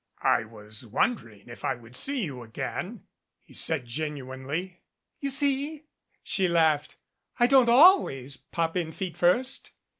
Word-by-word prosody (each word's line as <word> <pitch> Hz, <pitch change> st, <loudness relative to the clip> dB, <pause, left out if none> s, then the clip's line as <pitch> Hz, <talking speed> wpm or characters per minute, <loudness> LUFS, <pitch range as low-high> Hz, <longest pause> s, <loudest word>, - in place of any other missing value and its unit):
"I 115 Hz, -, +3 dB
was 110 Hz, +2 st, -13 dB
wondering 115 Hz, -, -2 dB
if 120 Hz, -, -11 dB
I -, -, 0 dB
would 120 Hz, 0 st, -15 dB
see 270 Hz, -, -1 dB
you 135 Hz, -8 st, -5 dB
again," 115 Hz, -1 st, -5 dB, 0.4 s
he -, -, -19 dB
said 155 Hz, -6 st, -1 dB
genuinely. 145 Hz, +6 st, -5 dB, 0.4 s
"You 280 Hz, -, -2 dB
see," 285 Hz, +2 st, 0 dB, 0.4 s
she 190 Hz, -2 st, +1 dB
laughed, 160 Hz, -3 st, +2 dB, 0.4 s
"I 240 Hz, -, +6 dB
don't 255 Hz, -1 st, +5 dB
always 235 Hz, -, +5 dB
pop 165 Hz, +4 st, -3 dB
in 165 Hz, -3 st, -2 dB
feet 185 Hz, -1 st, -5 dB
first." 250 Hz, +10 st, +1 dB
160 Hz, 140 wpm, -27 LUFS, -, 0.4 s, I